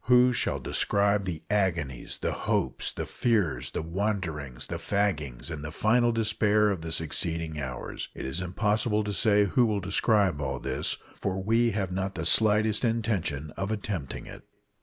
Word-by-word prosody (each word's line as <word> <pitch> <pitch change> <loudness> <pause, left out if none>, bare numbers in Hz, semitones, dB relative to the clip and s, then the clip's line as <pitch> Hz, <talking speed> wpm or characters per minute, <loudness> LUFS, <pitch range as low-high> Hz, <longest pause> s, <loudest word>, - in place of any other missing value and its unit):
Who 125 +1 +5
shall - - 0
describe 100 0 +1
the 85 -4 -4
agonies, 85 -11 -1
the - - 0
hopes, 65 0 -1
the - - -4
fears, 110 -8 0
the - - -4
wanderings, 85 - -3
the - - -5
faggings, 80 -10 -1
and 75 -3 -5
the 75 - -4
final 120 +7 +3
despair 105 -2 +2
of 95 -5 -3
the 80 0 -5
succeeding 80 0 0
hours? 65 -3 -5
It - - -6
is 65 +7 -2
impossible 105 +4 +1
to 105 0 -3
say 105 -1 +4
who 120 +5 +3
will 105 -2 0
describe 100 -3 +2
all 65 -2 -2
this, - - -2 0.2
for 95 -1 -3
we 115 +3 +3
have 95 -3 -2
not 95 +1 -2
the 80 -1 -3
slightest 110 +3 +4
intention 105 - -1
of 100 +5 -4
attempting 100 -9 -4
it. - - -10
100 Hz, 165 wpm, -28 LUFS, 80-105 Hz, 0.2 s, Who